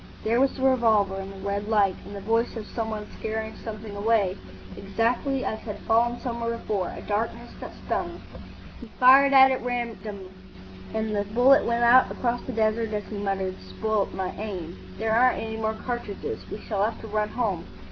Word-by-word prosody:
There 230 +3 +2
was 270 - +4
the 260 - -5
revolver 225 -7 +3
and 195 0 -6
the 195 0 -7
red 200 +1 -2
light.... 205 -3 +3
and 205 - -8
the 200 - -6
voice 230 +3 0
of 215 - -6
some 225 +1 -4
one 215 -1 -4
scaring 220 0 -3
something 215 -2 -7
away, 200 -2 +2 0.4
exactly 235 +7 -1
as 220 - -2
had 210 -2 -6
fallen 235 +2 +2
somewhere 235 -1 -2
before,—a 200 -5 -3
darkness 225 +3 -2
that - - -7
stung. - - -2 0.6
He 240 - -10
fired 270 +2 +7
at 265 -1 +6
random, 220 -6 -4 0.6
and 220 -1 -1
the 205 - +1
bullet 270 +4 +6
went 235 0 +1
out 245 +2 +6
across 245 -1 -1
the - - -2
desert 220 0 0
as 210 -1 -2
he 210 - -4
muttered, 195 -2 -1
"Spoilt 215 -2 -1
my 190 -1 -3
aim. 185 -5 -5 0.2
There 220 0 -1
aren't 250 +3 +4
any 220 0 -4
more 220 0 -1
cartridges. 240 -5 -5
We 210 - -6
shall 200 -3 -1
have 220 +2 -1
to 225 - -8
run 210 0 -1
home." 200 -8 -2
220 Hz, 185 wpm, -26 LUFS, 205-235 Hz, 0.6 s, fired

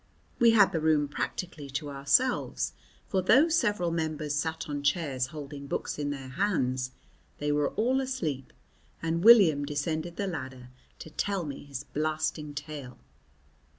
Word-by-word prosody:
We 235 - +7
had 205 -3 +6
the 165 - 0
room 155 -2 +3
practically 150 0 -4
to 145 +2 -4
ourselves, 140 - +1 0.3
for 190 - +1
though 275 - +5
several 210 - +1
members 155 -2 -2
sat 160 +2 -2
on 145 -1 -3
chairs 140 -3 0
holding 145 -1 -8
books 140 - -3
in 145 -1 -1
their 135 -2 -5
hands 130 -7 0 0.5
they 145 0 -1
were 145 -1 +2
all 255 +5 +2
asleep, 165 - -3 0.5
and 165 +1 0
William 195 -11 +7
descended 155 +3 -2
the 200 - -2
ladder 130 -8 -6 0.3
to 160 - -10
tell 195 -1 -1
me 140 -1 -7
his 140 -1 -6
blasting 155 0 -2
tale. 145 -4 -7
155 Hz, 150 wpm, -29 LUFS, 140-180 Hz, 0.5 s, We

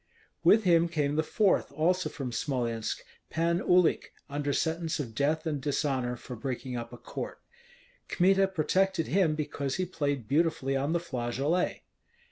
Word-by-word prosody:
With 220 +1 +6
him 170 -2 +4
came 150 -3 0
the 155 - +3
fourth, 190 +3 +1
also 175 +5 +1
from 135 -4 -5
Smolensk, 115 -3 -2 0.3
Pan 170 +1 +1
Uhlik, 180 -1 +3 0.2
under 145 0 -1
sentence 160 +2 -1
of 120 -6 -4
death 150 +6 0
and 150 -4 -2
dishonor 135 -4 0
for 125 - -8
breaking 125 +2 -4
up 120 -1 -5
a 120 - -9
court. 120 - -6 0.7
Kmita 195 +2 +4
protected 190 0 +1
him 170 -4 +2
because 145 -3 -3
he 185 - 0
played 145 -9 -2
beautifully 145 -3 +1
on 140 +4 0
the 170 - +2
flageolet. 140 +4 -1
150 Hz, 150 wpm, -29 LUFS, 135-170 Hz, 0.7 s, With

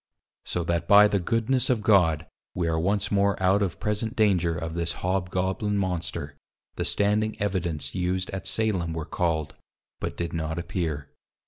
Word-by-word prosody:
So 90 - -2
that 85 0 -1
by 105 +1 +8
the 100 -1 +1
Goodness 115 +6 +1
of 120 -4 +1
God 85 -7 +4 0.3
we 85 -2 0
are 80 -1 +1
once 100 +4 0
more 100 0 +2
out 95 +2 +3
of 95 -4 -1
present 105 +3 -2
danger 90 -7 +2
of 80 -1 -4
this 85 0 -2
Hobgoblin 95 +2 0
Monster; 85 -6 -3 0.4
the - - -2
standing 105 +2 +1
Evidence 85 -8 -2
used 90 0 -1
at 95 -1 -5
Salem 95 -7 0
were 80 -1 -4
called, 80 -3 -1 0.5
but - - -4
did 85 -1 -3
not 80 -1 -2
appear. 85 - -3
90 Hz, 160 wpm, -26 LUFS, 85-100 Hz, 0.5 s, by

